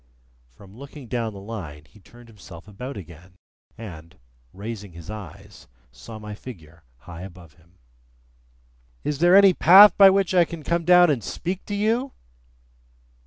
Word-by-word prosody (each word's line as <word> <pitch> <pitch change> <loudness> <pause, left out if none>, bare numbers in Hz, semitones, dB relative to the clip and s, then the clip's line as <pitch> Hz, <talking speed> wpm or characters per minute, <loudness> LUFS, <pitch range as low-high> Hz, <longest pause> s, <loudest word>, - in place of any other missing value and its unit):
From 95 +11 -18
looking 140 +1 -12
down 115 -2 -3
the 100 - -11
Line, 90 -9 -9
he 105 - -22
turned 120 +4 -18
himself 100 -5 -15
about 125 +7 -9
again, 90 0 -14 0.4
and, 85 -7 -12 0.3
raising 100 -2 -9
his 85 +4 -11
eyes, 105 -7 -12 0.2
saw 65 - -12
my 105 -1 -9
figure 85 -9 -13 0.2
high 85 +2 -11
above 90 -4 -13
him. 85 +4 -28 1.3
"Is 150 -2 -3
there 175 +2 +4
any 195 -1 +6
path 195 +5 +7
by 195 -1 +9
which 190 -1 0
I 180 -1 +5
can 170 -2 -9
come 170 +2 -2
down 180 -1 +5
and 125 -7 -3
speak 180 - -6
to 205 - -5
you?" 230 +6 -1
110 Hz, 155 wpm, -23 LUFS, -, 1.3 s, by